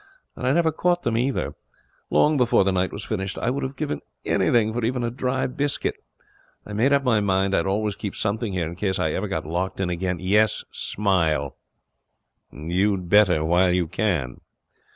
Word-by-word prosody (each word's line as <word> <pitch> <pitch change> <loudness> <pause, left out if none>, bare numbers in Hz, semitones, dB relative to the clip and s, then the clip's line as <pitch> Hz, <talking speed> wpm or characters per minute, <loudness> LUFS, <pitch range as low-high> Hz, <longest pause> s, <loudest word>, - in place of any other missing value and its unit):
And 125 - -3
I - - +4
never 165 +2 +3
caught 175 +3 0
them 115 - 0
either. 125 +3 -1 0.6
Long 150 +1 +3
before 125 -6 +3
the 95 - +1
night 95 0 0
was 100 - -6
finished 95 -3 -3
I 120 - 0
would 140 - -2
have 135 +1 -4
given 75 - -3 0.2
anything 110 -2 +2
for 120 0 -2
even 120 +2 0
a 120 - -1
dry 130 +1 -1
biscuit. 140 +2 -1 0.7
I 105 - -8
made 120 +7 +2
up 140 -1 +3
my 120 -5 +3
mind 95 -1 +1
I'd 85 - +1
always 105 +1 0
keep 100 - -5
something 110 0 -1
here 90 -3 -1
in 85 +2 -6
case 95 0 -1
I 80 - 0
ever 100 +6 -2
got 80 -6 -3
locked 90 +5 -3
in 90 -2 -1
again 90 +1 -2
yes, 105 +4 +2
smile. 85 -8 0 1.0
You'd 90 +4 -1
better 90 -6 +4
while 90 +3 +3
you 90 -1 +2
can.' 80 - -2
100 Hz, 190 wpm, -24 LUFS, 90-120 Hz, 1.0 s, I